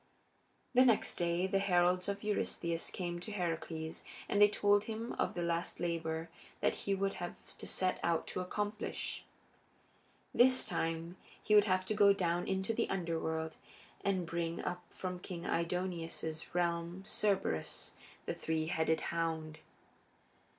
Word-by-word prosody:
The 255 +1 +7
next 235 -4 +3
day 175 +1 +1
the 195 +1 +2
heralds 180 -1 +3
of 200 +1 -3
Eurystheus 170 -5 -1
came 175 -2 -3
to 195 +5 -7
Heracles 165 -4 -3 0.2
and 205 - +2
they 205 - +10
told 205 0 +3
him 225 +1 -4
of - - +1
the 175 - -1
last 170 0 -1
labor 165 -1 -1 0.3
that - - +2
he 200 - -1
would 195 0 0
have 175 - -6
to - - -6
set 185 -1 +1
out 170 -1 +1
to - - -3
accomplish 205 +3 -3 1.1
this 255 +1 +6
time 165 +2 -2 0.3
he 210 - +2
would 210 -1 +8
have 185 -2 +2
to 215 - 0
go 205 -1 +7
down 175 -2 0
into 190 +3 0
the - - 0
Underworld, 160 -3 -1 0.5
and 190 -3 +1
bring 165 0 -2
up 180 - -2
from 180 -1 -4
King 175 -1 -6
Aidoneus's 170 -2 -2
realm 170 +1 0
Cerberus, 195 - 0 0.3
the - - -1
three 160 -1 -1
headed 160 0 +1
hound. 160 -2 -2
175 Hz, 145 wpm, -35 LUFS, 165-195 Hz, 1.1 s, they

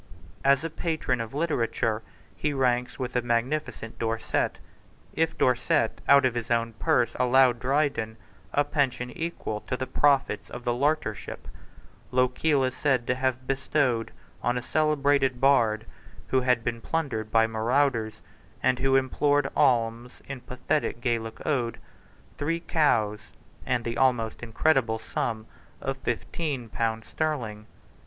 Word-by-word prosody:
As 140 +1 +4
a 165 - -3
patron 155 -7 -1
of 115 +3 -6
literature 115 -8 0 0.3
he 150 -1 -1
ranks 125 -2 +1
with 125 -1 -4
the 125 - +1
magnificent 120 0 -2
Dorset. 115 0 -1 0.6
If 165 0 0
Dorset 120 -3 +1
out 140 -1 +7
of 130 - +2
his 120 -1 -4
own 115 -1 +1
purse 120 +5 +2
allowed 125 -1 +4
Dryden 130 -4 0 0.3
a 145 - +3
pension 125 -5 -1
equal 160 -10 -4
to 125 - -1
the 130 - -2
profits 140 +1 +2
of 120 - -8
the 120 - +1
Laureateship, 140 -4 -1 0.6
Lochiel 130 +3 +2
is 130 0 -1
said 130 -4 +1
to 125 - +1
have 130 0 -1
bestowed 135 -3 0 0.3
on 120 0 0
a 125 - -3
celebrated 145 -4 +2
bard, 115 -5 +3 0.4
who 130 - +3
had 125 -2 +2
been 115 0 -2
plundered 125 -10 -2
by 115 0 +4
marauders, 115 0 0 0.4
and 125 - +3
who 135 0 +2
implored 145 +1 +2
alms 120 0 +2
in 135 -1 -5
a - - -24
pathetic 125 +1 -2
Gaelic 115 -2 -2
ode, 125 -6 0 0.6
three 165 +3 -1
cows 110 -12 +2 0.5
and 120 -2 0
the 115 0 -2
almost 120 -4 +1
incredible 120 0 +1
sum 110 0 -3 0.3
of 135 0 -3
fifteen 130 0 -3
pounds 115 0 -2
sterling. 120 -9 -3
125 Hz, 140 wpm, -27 LUFS, 115-140 Hz, 0.6 s, out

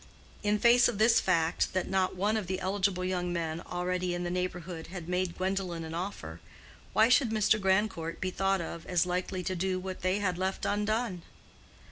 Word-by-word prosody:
In 210 0 +2
face 240 +2 +6
of 240 - -2
this 225 +2 +5
fact 165 0 +1
that 185 -1 0
not 190 -1 +1
one 205 +4 +1
of 215 -5 -2
the 185 +1 -2
eligible 190 -1 0
young 180 -1 -1
men 165 -1 -2
already 180 0 -2
in 175 - -3
the 175 - -2
neighborhood 180 -2 -4
had 175 -2 -7
made 180 -1 -1
Gwendolen 185 -3 -2
an 160 0 -6
offer, 185 +4 -5 0.5
why 220 +1 +5
should 250 0 +4
Mr. 215 -1 +2
Grandcourt 190 -4 0
be 185 - -2
thought 195 0 +1
of 165 0 -7
as 180 -1 +2
likely 180 +1 -2
to 185 - -2
do 185 +1 0
what 185 0 -6
they 185 +2 +1
had 185 -3 -1
left 190 +1 -2
undone? 210 -2 0
185 Hz, 190 wpm, -30 LUFS, 175-200 Hz, 0.5 s, face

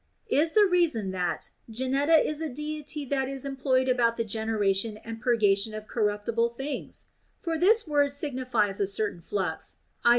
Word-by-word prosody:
Is 320 +3 +3
the 425 -1 +6
reason 330 - +1
that 180 -2 -2 0.2
Geneta 265 +7 +2
is 305 0 0
a 320 - -2
deity 300 +2 -4
that 265 0 -1
is 275 0 -5
employed 265 -1 +1
about 235 -2 +2
the 230 - 0
generation 215 -1 0
and 225 +1 -8
purgation 215 -4 +2
of 215 0 -7
corruptible 220 +2 0
things] 280 +2 -5 0.3
For 330 -2 -2
this 405 +5 +4
word 290 -2 +2
signifies 255 -8 0
a 200 - +1
certain 200 -2 -1
flux 180 -2 -3 0.3
(i. - - +5
250 Hz, 160 wpm, -27 LUFS, 215-290 Hz, 0.3 s, the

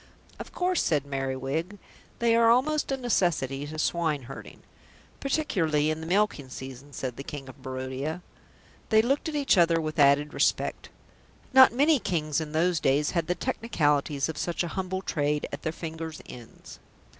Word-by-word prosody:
"Of - - -8
course," 360 0 0
said 145 -3 +1
Merriwig, 135 +7 -3 0.4
"they 235 -1 +3
are 230 0 +5
almost 285 +5 +2
a 270 - 0
necessity 160 - 0
to 155 +1 -7
swineherding." 150 -5 -2 0.6
"Particularly 165 - +1
in 155 0 -4
the 160 - -6
milking 180 -7 +1
season," 130 +2 -9
said 130 -3 -5
the 140 - -6
King 140 -1 -7
of 130 - -13
Barodia. 130 +6 -4 0.7
They 220 -1 +5
looked 275 +6 0
at 310 - -5
each 275 -9 +3
other 165 -1 +4
with 155 0 -4
added 145 +1 +4
respect. - - 0 0.6
Not 260 0 +9
many 285 +4 +3
Kings 155 -6 -1
in 155 -1 -6
those 165 +2 +1
days 145 +2 +2
had 170 -3 -1
the 180 - 0
technicalities 150 - 0
of 160 - -5
such 175 0 -1
a 175 - -3
humble 190 0 -3
trade 150 -2 -1
at 140 - -6
their 160 - -2
fingers' 160 -1 -6
ends. 120 -2 -12
160 Hz, 165 wpm, -27 LUFS, 140-205 Hz, 0.7 s, Not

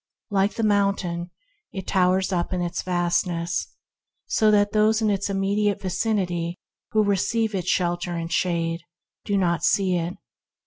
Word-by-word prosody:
Like 200 +1 +2
the 225 - -2
mountain, 200 -4 +1 0.4
it 190 -2 -6
towers 185 0 +2
up 175 -2 -1
in 180 - -1
its 175 0 -2
vastness, 175 -1 0 0.6
so 215 - +3
that 205 -1 +4
those 215 +1 +3
in 215 -2 +2
its 200 0 -1
immediate 200 +1 +1
vicinity, 180 -3 -1 0.3
who 215 -1 +3
receive 210 +3 +1
its 185 -3 -2
shelter 175 -1 0
and 165 0 -3
shade, 170 -1 0 0.4
do 205 -1 +1
not 170 -3 +1
see 185 -1 +2
it. 170 +1 -3
185 Hz, 145 wpm, -24 LUFS, 175-205 Hz, 0.6 s, that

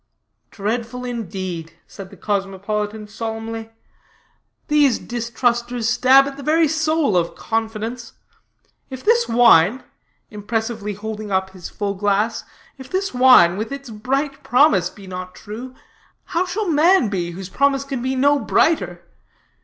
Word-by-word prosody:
"Dreadful 230 +4 -4
indeed," 185 -8 -5
said 195 -2 -11
the - - -15
cosmopolitan 210 +1 -3
solemnly. 225 +1 -5 1.0
"These 295 -4 +3
distrusters 240 0 -2
stab 260 +4 +5
at 275 0 -6
the - - -8
very 315 +3 +3
soul 315 - +1
of 170 -1 0
confidence. 225 +1 -4 0.8
If 260 -1 -8
this 470 +2 +3
wine," 230 -1 +5 0.5
impressively 220 0 -3
holding 215 0 -6
up 190 0 0
his 185 -2 -9
full 205 -2 -3
glass, 205 +3 0 0.4
"if 265 0 -10
this 385 -2 -2
wine 250 -9 +6
with 220 +5 -4
its 275 -3 -7
bright 275 +6 -2
promise 235 - +3
be 200 +1 -14
not 185 0 -7
true, 245 +5 -9 0.5
how 360 +2 -1
shall 410 +3 -2
man 330 - +4
be, 180 -4 -2
whose 190 +1 -8
promise 275 +4 +1
can 275 -3 -4
be 260 +1 -1
no 285 +2 +3
brighter? 180 - +1
225 Hz, 135 wpm, -20 LUFS, 205-270 Hz, 1.0 s, wine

